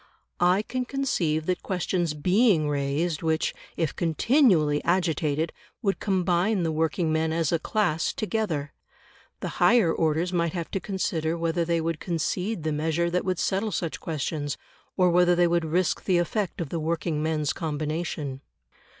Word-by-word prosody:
I 180 +4 +3
can 255 +3 -3
conceive 175 - 0
that 180 +1 -1
questions 175 -3 -1
BEING 180 +1 +3
raised 145 +3 -1
which, 160 -1 0 0.2
if 160 -4 -1
continually 170 - +3
agitated, 160 -3 0 0.3
would 195 -2 0
combine 185 0 +1
the 165 - 0
working 160 +1 0
men 160 0 +1
as 165 -2 0
a 170 - +2
class 175 -3 0
together, 200 -10 -2 0.7
the - - -2
higher 215 -9 +5
orders 165 +3 0
might 170 -1 +1
have 170 -3 -4
to 195 - -1
consider 170 -5 -2
whether 170 +1 0
they 170 0 +1
would 165 -1 -2
concede 180 +3 -2
the 155 - 0
measure 160 +3 0
that 180 - 0
would 185 -2 0
settle 200 +5 0
such 170 -5 -3
questions, 150 -2 -3 0.4
or 180 -2 +4
whether 175 0 +4
they 175 0 +4
would 170 -1 +1
risk 170 +3 0
the 185 -3 +3
effect 175 +1 -1
of 160 - -4
the 165 - -2
working 160 -1 -1
men's 155 -2 0
combination. 155 -3 -3
170 Hz, 160 wpm, -26 LUFS, 155-185 Hz, 0.7 s, higher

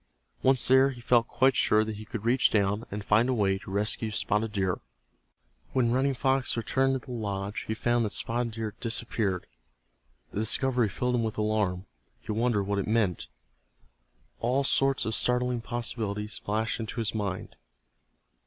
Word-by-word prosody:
Once 130 -1 +4
there 130 +1 +6
he 130 -3 -8
felt 120 -1 +3
quite 130 -1 +2
sure 110 0 +4
that 110 -1 -5
he 110 - -9
could 110 0 -6
reach 125 +2 +4
down, 105 +1 +1
and 105 0 -6
find 110 +4 +3
a 130 - +1
way 95 -3 +1
to - - -11
rescue 105 +3 0
Spotted 105 +1 0
Deer. 95 -3 -1 0.9
When 125 -3 +2
Running 135 +2 +1
Fox 135 -1 +1
returned 135 +3 +1
to - - -20
the - - -9
lodge 105 -1 -4
he 110 - -2
found 120 +1 +1
that 105 - -3
Spotted 115 0 -1
Deer 110 -1 -4
had - - -32
disappeared. 115 -5 -1 0.9
The - - -3
discovery 120 +1 +1
filled 125 +5 -1
him 120 - +1
with 110 -1 -3
alarm. 105 -4 0 0.3
He - - -6
wondered 115 -1 +1
what 100 +1 -1
it 100 - -3
meant. 105 -6 0 1.1
All 125 +4 +1
sorts 135 0 +2
of 110 - -1
startling 125 0 +2
possibilities 110 -3 -2
flashed 110 +3 -1
into 115 +1 -5
his 115 -2 -1
mind. 100 -4 -4
115 Hz, 170 wpm, -28 LUFS, 105-125 Hz, 1.1 s, there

